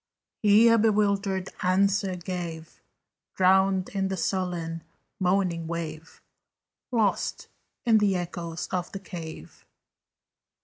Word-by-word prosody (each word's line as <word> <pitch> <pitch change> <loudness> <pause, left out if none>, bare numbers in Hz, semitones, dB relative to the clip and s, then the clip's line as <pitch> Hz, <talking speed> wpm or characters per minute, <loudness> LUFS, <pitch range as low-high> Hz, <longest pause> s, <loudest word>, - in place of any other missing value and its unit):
He 215 +2 +6
a 230 0 +5
bewildered 200 -3 +1
answer 195 +1 +2
gave, 170 -3 -6 0.5
Drowned 190 0 +3
in 195 -1 -1
the 190 0 -3
sullen 175 -3 -2 0.4
moaning 180 -3 +1
wave, 165 -1 -6 0.7
Lost 220 -5 0 0.4
in 225 -2 +5
the 200 -2 +2
echoes 175 -1 -4
of 180 -1 -2
the 195 - -4
cave. 170 -4 -9
185 Hz, 100 wpm, -27 LUFS, 170-200 Hz, 0.7 s, He